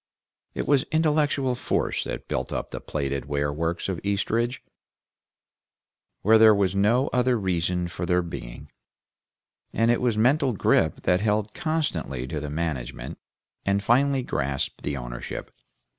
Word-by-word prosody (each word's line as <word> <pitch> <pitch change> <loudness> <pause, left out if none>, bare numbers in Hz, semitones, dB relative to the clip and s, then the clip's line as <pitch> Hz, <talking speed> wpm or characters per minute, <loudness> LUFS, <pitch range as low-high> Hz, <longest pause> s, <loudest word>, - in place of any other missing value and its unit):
It - - -2
was 140 -2 +4
intellectual 150 -4 +2
force 120 - -1
that - - -5
built - - -2
up - - -4
the - - -5
Plated 70 -2 -3
Ware 70 0 -1
Works 85 +3 -2
of 95 -3 -2
Eastridge, 115 +5 0 1.6
where 110 +2 +6
there 110 -1 +8
was 95 -3 +1
no 110 +7 +3
other 125 0 +2
reason 90 -2 0
for 85 0 -5
their 90 +1 +2
being, 70 -4 -8 1.0
and 115 +1 +2
it 120 - +1
was 120 -3 +1
mental 130 +3 +3
grip 100 - +2
that 90 +1 +2
held 105 0 0
constantly 90 - -2
to 75 +4 -4
the 75 0 -5
management, 75 -5 -4 0.4
and 100 +1 +1
finally 135 +3 +3
grasped 70 - -2
the 70 -1 -3
ownership. - - -6
100 Hz, 145 wpm, -25 LUFS, 75-125 Hz, 1.6 s, there